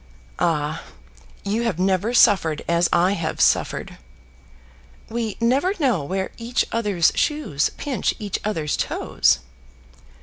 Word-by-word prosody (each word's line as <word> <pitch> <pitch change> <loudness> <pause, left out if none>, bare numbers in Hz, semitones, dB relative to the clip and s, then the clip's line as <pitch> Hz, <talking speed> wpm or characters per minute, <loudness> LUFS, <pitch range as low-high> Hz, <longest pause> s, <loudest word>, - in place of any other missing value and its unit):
"Ah, 155 -2 0 0.6
you 210 +3 0
have 230 -8 -1
never 190 +4 +1
suffered 190 -10 +4
as 170 0 +2
I 175 +2 +3
have 165 -5 -3
suffered." - - +1 1.1
"We 225 -2 -3
never 270 - +2
know 245 - +1
where 190 +6 -3
each 235 +2 0
other's 205 -7 +2
shoes 295 - 0
pinch 280 -3 -1
each 205 -4 -4
other's 160 -8 -1
toes." - - +1
195 Hz, 115 wpm, -22 LUFS, 165-230 Hz, 1.1 s, suffered